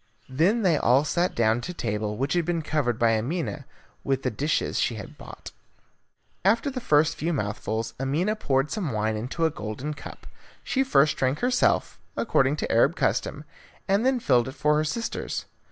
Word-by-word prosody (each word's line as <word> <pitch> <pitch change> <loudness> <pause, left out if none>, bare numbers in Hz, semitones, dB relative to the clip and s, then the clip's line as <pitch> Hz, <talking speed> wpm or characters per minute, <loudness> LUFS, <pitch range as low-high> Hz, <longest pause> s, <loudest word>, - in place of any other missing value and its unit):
Then 180 - +2
they 170 -5 +3
all 130 +3 +4
sat 175 +4 0
down 115 +1 +2
to 180 +7 -6
table, 105 -3 -2
which 135 +2 -1
had 175 -1 +2
been 170 -1 -1
covered 145 -7 0
by 115 -1 +3
Amina 150 +2 -3 0.4
with 135 -1 -1
the 130 - 0
dishes 145 +7 -1
she 115 - 0
had 105 - -9
bought. - - -11 0.9
After 230 +8 +2
the 255 -1 -5
first 155 -4 +3
few 165 +3 -2
mouthfuls 110 -2 -3
Amina 155 +11 0
poured 135 -8 0
some 180 - -2
wine 110 0 0
into 125 +10 -2
a 160 - +2
golden 120 +4 -5
cup. 145 - -11 0.4
She 265 - +1
first 155 - +3
drank 130 +2 0
herself, 250 0 +1 0.2
according - - +2
to - - -3
the - - -4
Arab - - +4
custom, - - -1 0.4
and 200 +3 +2
then 260 0 +2
filled 125 - +2
it 130 - -6
for 150 +2 +2
her 155 - +2
sisters. 230 +10 -3
145 Hz, 185 wpm, -26 LUFS, 120-175 Hz, 0.9 s, all